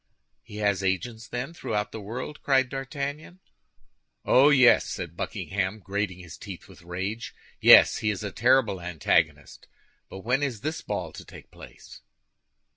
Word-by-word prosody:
"He 105 - -13
has 100 -3 +1
agents, 110 +5 -2
then, 125 +6 -5
throughout 105 -9 -3
the 110 - -7
world?" 125 +8 -7
cried 135 -2 +2
D'Artagnan. 140 +6 -5 0.9
"Oh, 135 +3 +6
yes," 130 -4 +6
said - - -6
Buckingham, 95 +1 -3
grating 100 -2 -3
his 90 -4 -11
teeth - - -9
with - - -16
rage. 95 +7 -5 0.2
"Yes, - - +8
he 105 - -1
is 105 -1 -3
a 100 - -4
terrible 120 -5 +2
antagonist. 85 -3 -1 0.4
But 95 - -9
when 125 +6 0
is 130 -7 -2
this 155 +3 -3
ball - - -4
to - - -10
take - - -14
place?" - - -14
110 Hz, 150 wpm, -26 LUFS, 95-135 Hz, 0.9 s, Yes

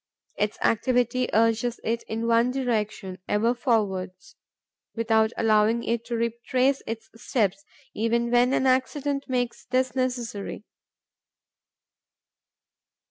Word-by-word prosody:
Its 210 0 -1
activity 245 +1 +1
urges 230 +2 +2
it 230 +1 -1
in 225 +1 -3
one 230 +1 +3
direction, 215 -7 -2
ever 225 +3 +2
forwards, 210 -1 -1 0.6
without 220 -1 +2
allowing 220 +1 +3
it 235 0 -1
to 235 0 -4
retrace 240 +4 0
its 225 0 -5
steps, 200 -5 -1 0.3
even 235 +2 0
when 245 +1 +4
an 265 - +1
accident 275 +2 +1
makes 245 -2 -2
this 255 0 0
necessary. 245 -6 -3
235 Hz, 105 wpm, -26 LUFS, 220-250 Hz, 0.6 s, when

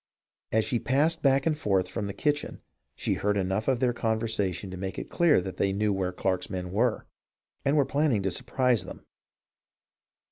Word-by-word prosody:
As 110 0 +2
she 120 - 0
passed 150 +7 +1
back 135 -1 +3
and 160 -2 +2
forth 95 -10 +1
from 100 - -4
the 100 - -4
kitchen 150 +4 -1 0.4
she - - -1
heard 105 0 0
enough 95 +3 -1
of 130 -3 +2
their 125 -2 +2
con 110 -2 0
versation 100 -4 -2
to - - -6
make 95 0 -5
it - - -6
clear 170 - +4
that 95 0 -6
they 100 - +1
knew 105 +1 +1
where 95 -1 -1
Clarke's 95 0 -1
men 90 -2 -4
were, 115 +3 +1 0.6
and 140 +2 +2
were 140 - +4
planning 140 -9 +1
to 95 - 0
surprise 125 +3 +1
them. 90 - -10
110 Hz, 190 wpm, -28 LUFS, 95-135 Hz, 0.6 s, clear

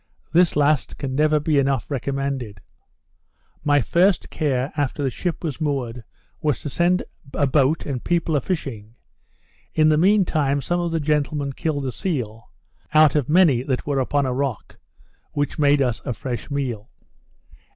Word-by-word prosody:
This 175 0 +4
last 145 -1 +1
can 135 -2 -4
never 155 +2 +3
be 150 -1 +2
enough 135 -1 0
recommended. 135 -5 -3 1.0
My 145 -1 +3
first 180 - +2
care, 135 -3 -1
after 145 0 -1
the 135 - 0
ship 175 +6 -4
was 155 -2 -4
moored, 130 -6 -2 0.4
was 150 -5 0
to 145 - -5
send 175 +5 +2 0.3
a 145 - +2
boat 140 +3 +2
and 130 -4 -4
people 170 -2 0
a 145 - +2
fishing; 120 - -4 0.8
in 155 -1 +5
the 155 0 +3
mean 195 +3 +4
time, 145 -4 +1
some 175 +6 -1
of 170 -1 -1
the 165 - 0
gentlemen 145 -2 0
killed 145 -1 -2
a 130 - -2
seal, 120 - -4 0.5
(out 155 -2 +7
of 145 -4 0
many 155 -7 +5
that 130 -1 -2
were 140 -2 0
upon 140 +2 +1
a 130 - -1
rock,) 135 -4 -3 0.6
which 145 +2 -2
made 145 -1 +4
us 120 -3 -1
a 125 - -2
fresh 125 -2 -5
meal. 125 -6 -3
145 Hz, 165 wpm, -22 LUFS, 130-155 Hz, 1.0 s, out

